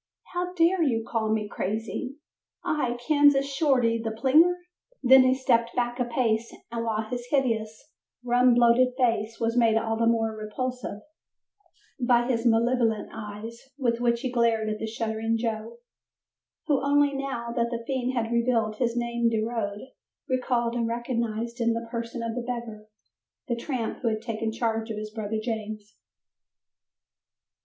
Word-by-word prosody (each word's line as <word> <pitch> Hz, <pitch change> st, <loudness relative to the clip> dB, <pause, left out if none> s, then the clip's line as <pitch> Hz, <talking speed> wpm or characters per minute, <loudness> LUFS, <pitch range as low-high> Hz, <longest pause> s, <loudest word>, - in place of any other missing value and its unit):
How 360 Hz, 0 st, -2 dB
dare 345 Hz, +1 st, +3 dB
you 230 Hz, -7 st, +1 dB
call 220 Hz, -2 st, -1 dB
me 215 Hz, -1 st, 0 dB
crazy? 220 Hz, +7 st, -4 dB, 0.5 s
I, 250 Hz, -6 st, -1 dB
Kansas 290 Hz, -2 st, +5 dB
Shorty, 265 Hz, -5 st, +2 dB
the 225 Hz, -, -1 dB
plinger?" 275 Hz, +10 st, +4 dB, 0.5 s
Then 265 Hz, +1 st, +8 dB
he 255 Hz, 0 st, +4 dB
stepped 235 Hz, -3 st, +1 dB
back 240 Hz, 0 st, -1 dB
a 250 Hz, -, +1 dB
pace 230 Hz, -2 st, 0 dB, 0.2 s
and 230 Hz, -1 st, -2 dB
while 220 Hz, -1 st, -1 dB
his 245 Hz, +2 st, -5 dB
hideous, 230 Hz, -1 st, -1 dB, 0.3 s
rum 245 Hz, 0 st, +4 dB
bloated 245 Hz, +1 st, +4 dB
face 230 Hz, -3 st, 0 dB
was 230 Hz, 0 st, 0 dB
made 230 Hz, -2 st, +4 dB
all 225 Hz, 0 st, 0 dB
the 230 Hz, 0 st, +2 dB
more 225 Hz, -1 st, +1 dB
repulsive 215 Hz, +1 st, -4 dB, 1.0 s
by 240 Hz, -1 st, +3 dB
his 240 Hz, -2 st, +1 dB
malevolent 230 Hz, -1 st, +2 dB
eyes 220 Hz, +2 st, -7 dB, 0.2 s
with 240 Hz, -4 st, 0 dB
which 235 Hz, -1 st, +2 dB
he 260 Hz, -2 st, -2 dB
glared 230 Hz, -3 st, +2 dB
at 215 Hz, -, -4 dB
the 220 Hz, -, -3 dB
shuddering 225 Hz, 0 st, -1 dB
Joe, 225 Hz, 0 st, -3 dB, 0.9 s
who 285 Hz, -4 st, +1 dB
only 285 Hz, 0 st, +3 dB
now, 270 Hz, -4 st, -3 dB
that 235 Hz, -1 st, 0 dB
the 235 Hz, -1 st, -4 dB
fiend 260 Hz, -1 st, -1 dB
had 230 Hz, -1 st, -1 dB
revealed 230 Hz, -2 st, +1 dB
his 235 Hz, 0 st, 0 dB
name 235 Hz, 0 st, +1 dB
de 220 Hz, -1 st, 0 dB
road 220 Hz, -3 st, -3 dB, 0.5 s
recalled 245 Hz, -2 st, 0 dB
and 235 Hz, -1 st, 0 dB
recognized 235 Hz, 0 st, -2 dB
in 230 Hz, 0 st, +3 dB
the 230 Hz, 0 st, -4 dB
person 235 Hz, 0 st, -4 dB
of 230 Hz, -1 st, -2 dB
the 245 Hz, -, -3 dB
beggar, 235 Hz, -3 st, -6 dB, 0.6 s
the 240 Hz, -, 0 dB
tramp 235 Hz, -1 st, -3 dB
who 245 Hz, -, -1 dB
had 220 Hz, -1 st, -1 dB
taken 225 Hz, -1 st, -2 dB
charge 225 Hz, 0 st, -1 dB
of 220 Hz, -, -4 dB
his 215 Hz, 0 st, -5 dB
brother 220 Hz, -1 st, -3 dB
James. 215 Hz, -2 st, -5 dB
235 Hz, 160 wpm, -26 LUFS, 225-250 Hz, 1.0 s, Then